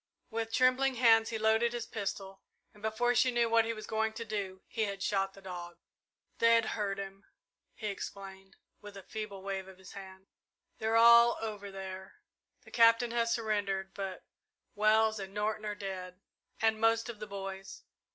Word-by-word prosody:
With 225 0 -3
trembling 255 +2 +3
hands 225 -2 +5
he 225 - -2
loaded 220 +2 +2
his 240 -1 -3
pistol, 195 -2 -5 0.3
and, 210 - -18
before 220 +3 +1
she 255 +2 +4
knew 240 -1 +2
what 230 -1 +5
he 230 - -1
was 215 -1 -8
going 220 0 -1
to 230 +1 -6
do, 200 -3 -4
he 220 -2 -1
had 200 -1 -5
shot 195 -1 0
the 195 - -15
dog. 175 -2 -7 0.6
"They'd 230 -1 +4
hurt 200 -2 -2
him," 195 0 -8 0.5
he 220 - -8
explained, 195 -1 -7 0.3
with 205 -1 -10
a 195 - -10
feeble 205 -2 -7
wave 195 -1 -4
of 190 -1 -13
his 190 -1 -13
hand. 190 -1 -11 0.5
"They're 220 +1 +1
all 235 +1 +7
over 210 -2 -5
there. 190 0 -8 0.5
The - - -15
Captain 230 0 +5
has 235 -1 +1
surrendered, 200 -4 -1
but 195 -2 -6 0.5
Wells 220 0 +3
and 195 0 -8
Norton 215 +1 -1
are 210 - -3
dead 185 -2 -6 0.4
and 220 -1 +2
most 225 +1 +3
of 235 -3 -7
the 210 - -6
boys. 195 -1 -7
210 Hz, 175 wpm, -32 LUFS, 195-225 Hz, 0.6 s, all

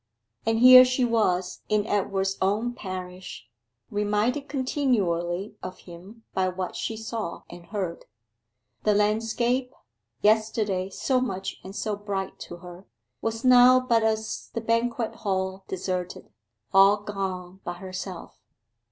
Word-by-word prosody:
And 225 0 +2
here 255 +2 +10
she 255 0 +1
was 185 -6 0
in 210 -1 +2
Edward's 195 -2 0
own 210 +6 +1
parish, 185 -3 -7 0.5
reminded 210 +7 0
continually 205 - -1
of 185 - -7
him 190 +6 -13
by 185 -1 +1
what 185 0 -4
she 220 - -3
saw 220 -5 -5
and 175 0 -12
heard. 190 -5 -4 0.8
The 210 -1 +2
landscape, 225 +4 +1 0.5
yesterday 210 -3 +2
so 255 +6 0
much 195 -6 -4
and 190 +1 -9
so 215 -1 -2
bright 200 -2 -4
to - - -7
her, 180 +2 -11 0.3
was 225 +2 -3
now 255 0 +8
but 240 -3 +2
as 220 0 -1
the 230 - -1
banquet 230 +1 -1
hall 190 -2 -2
deserted 180 -1 -4 0.4
all 195 +2 +7
gone 190 -3 -5
but 175 0 -5
herself. 185 0 -7
205 Hz, 125 wpm, -26 LUFS, 185-230 Hz, 0.8 s, here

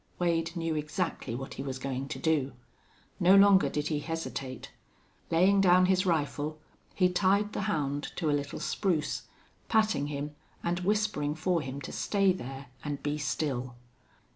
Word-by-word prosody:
Wade 165 -1 0
knew 165 -1 -1
exactly 155 -4 -2
what 135 +2 -6
he - - -6
was 135 -1 -4
going 135 0 -3
to - - -5
do. 150 -4 +1 0.7
No 185 +3 +6
longer 200 -1 +6
did 150 0 -2
he 150 -2 0
hesitate. 145 -5 -5 0.6
Laying 190 +4 +4
down 185 -1 +6
his 185 +1 +2
rifle, 155 -2 0 0.4
he 185 - +4
tied 200 +3 +2
the - - -2
hound 145 -2 -1
to 165 - -2
a - - +2
little 145 +1 -2
spruce, 175 -7 -1 0.4
patting 215 -10 +2
him 145 0 -4 0.3
and 175 +1 0
whispering 180 -7 0
for 170 +1 +1
him 135 0 -5
to - - -7
stay 195 -2 +2
there 135 -4 -7 0.2
and 145 -2 -4
be 150 +1 -1
still. 130 -3 -2
160 Hz, 160 wpm, -30 LUFS, 145-185 Hz, 0.7 s, No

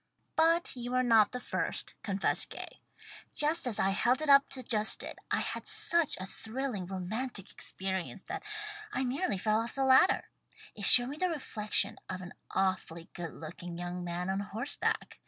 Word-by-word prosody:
"But 330 0 +3
you 245 0 -5
were 255 0 +3
not 225 -4 +5
the 250 - -4
first," - - -3
confessed 195 -1 +1
Gay. - - -9 0.5
"Just 305 0 +1
as 225 - -2
I 195 - +2
held 240 +6 +2
it 305 - -2
up 280 0 +7
to 270 -1 -4
adjust 215 -3 +1
it, - - -8
I - - +1
had - - -3
such 340 -3 +4
a 185 - -4
thrillingly 220 -2 -4
romantic 200 +3 -4
experience 190 +1 -3
that 395 +3 -5 0.5
I 260 - -1
nearly 260 - -1
fell 215 +3 +1
off 230 +1 -3
the 270 -1 +1
ladder. 265 +8 +5 0.4
It 205 - -3
showed 245 0 +8
me 290 - -6
the 365 +2 +1
reflection 220 -9 0
of 185 0 -4
an 180 - -9 0.2
awfully 175 -3 -2
good 170 -2 -6
looking 170 +2 -8
young 175 +1 -5
man 175 +2 -3
on 195 - -1
horse 220 +7 -4
back. - - -2
220 Hz, 180 wpm, -31 LUFS, 190-265 Hz, 0.5 s, showed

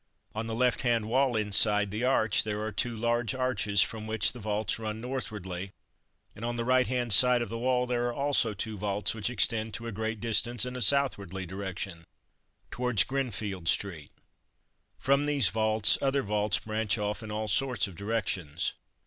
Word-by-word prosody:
On 110 +1 -4
the 115 - -3
left 125 +1 +1
hand 115 -3 +1
wall 130 0 +2
inside 105 -1 +3
the 110 +3 -3
arch 110 -5 +3
there 105 -1 -3
are 110 - -3
two 115 +3 -1
large 120 0 0
arches, 130 -6 +2
from 110 -1 -6
which 110 -1 +2
vaults 110 -3 -2
run 110 -1 -4
northwardly, 105 -7 -5 0.6
and 110 - -10
on 120 0 -2
the 115 -1 -2
right 130 0 +3
hand 120 -3 0
side 125 +5 +7
of 120 - -7
the 115 +1 -4
wall 125 0 +1
there 120 -1 -1
are 120 - -2
also 140 -6 +1
two 105 +1 -4
vaults 100 0 0
which 110 0 -2
extend 110 -3 0
to 115 - -7
a 115 - -4
great 110 +1 -3
distance 115 +1 +1
in 125 0 -6
a 125 - -4
southwardly 100 -7 0
direction, 95 -2 -6 0.7
towards 125 -4 +2
Grinfield 105 -9 -3
street. 85 -7 -1 0.9
From 140 +2 +2
these 140 -8 +4
vaults, 110 -1 +2
other 135 0 +1
vaults 105 -1 +1
branch 110 -2 -2
off 105 0 -3
in 110 - -8
all 110 +1 -3
sorts 125 +3 +1
of 95 - -11
directions. 95 -6 -2
110 Hz, 180 wpm, -29 LUFS, 105-125 Hz, 0.9 s, side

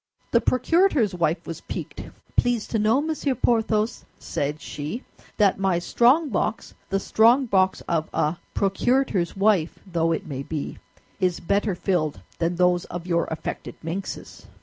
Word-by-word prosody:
The 235 - +4
procurator's 255 - +3
wife 170 -1 0
was 165 0 -6
piqued. - - -6 0.3
"Please 245 -3 +2
to 225 - 0
know, 220 +6 +3
Monsieur 305 -3 -1
Porthos," 225 -2 +1
said 145 +2 -3
she, 150 - -5 0.3
"that 200 -3 +3
my 190 -3 +2
strongbox, 235 - +2 0.2
the 195 - +1
strongbox 220 -3 +3
of 160 -2 -1
a 155 +3 0 0.2
procurator's 200 -2 +1
wife 195 -5 +2
though 165 -3 0
it 165 - -2
may 135 -3 -5
be, 145 +1 -5 0.4
is 180 -3 +1
better 200 +2 0
filled 175 -5 0 0.2
than 170 +1 0
those 180 0 +2
of 175 -1 -6
your 170 -2 +1
affected 160 - -5
minxes." 180 +4 -6
195 Hz, 140 wpm, -24 LUFS, 170-230 Hz, 0.4 s, The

